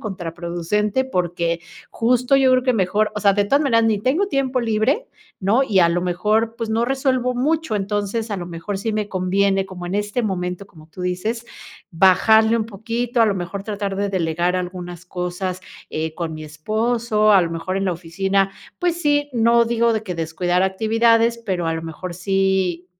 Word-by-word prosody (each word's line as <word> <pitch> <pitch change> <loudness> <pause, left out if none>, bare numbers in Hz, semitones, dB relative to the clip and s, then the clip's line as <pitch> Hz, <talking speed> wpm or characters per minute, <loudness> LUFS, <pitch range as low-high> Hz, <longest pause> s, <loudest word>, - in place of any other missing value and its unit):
contraproducente 180 +4 -2
porque 175 -6 -1 0.3
justo 245 +3 +2
yo 265 -1 +4
creo 255 -1 +3
que 255 -1 +2
mejor, 210 +1 +1
o 210 - -3
sea, 200 -1 +4
de 205 0 +2
todas 280 +8 +2
maneras 230 -5 +3
ni 220 -2 +2
tengo 280 - +1
tiempo 270 -7 0
libre, 235 - 0 0.3
¿no?, 210 +7 +2
y 205 -8 +2
a 170 - +5
lo 175 +1 0
mejor, 210 +6 0
pues, 230 -2 -4
no 225 +1 +1
resuelvo 255 -2 0
mucho, 300 0 0
entonces, 205 +2 -2
a 205 - -1
lo 175 - -5
mejor, 175 +4 -5
sí 220 +3 -2
me 210 -1 -2
conviene 195 +1 +1
como 185 -2 -8
en 180 - -4
este 210 +4 -1
momento, 180 -2 -3
como 155 -5 -17
tú 175 - -12
dices: 195 +6 -2 0.5
"bajarle 220 +6 +5
un 220 -2 -1
poquito, 230 +3 -2
a 225 - +6
lo 205 - +1
mejor, 195 +2 -5
tratar 205 -2 -3
de 200 +1 -1
delegar 175 -1 0
algunas 180 -1 -5
cosas", 180 +1 -4 0.3
eh, 155 0 -3
con 165 -2 -4
mi 155 0 -7
esposo, 215 +7 +1
a 195 - +7
lo 170 - -2
mejor, 165 +3 -3
en 195 0 -1
la 185 - +1
oficina, 190 +3 -1 0.3
pues 350 -1 0
sí, 290 -2 +2
no 235 0 +4
digo 235 0 +2
de 220 -1 -1
que 185 -4 -4
descuidar 175 +2 0
actividades, 225 +4 +2
pero, 180 -5 -1
a 165 - 0
lo 165 - -4
mejor, 165 +2 -6
sí 190 -1 0
200 Hz, 190 wpm, -21 LUFS, 180-230 Hz, 0.5 s, a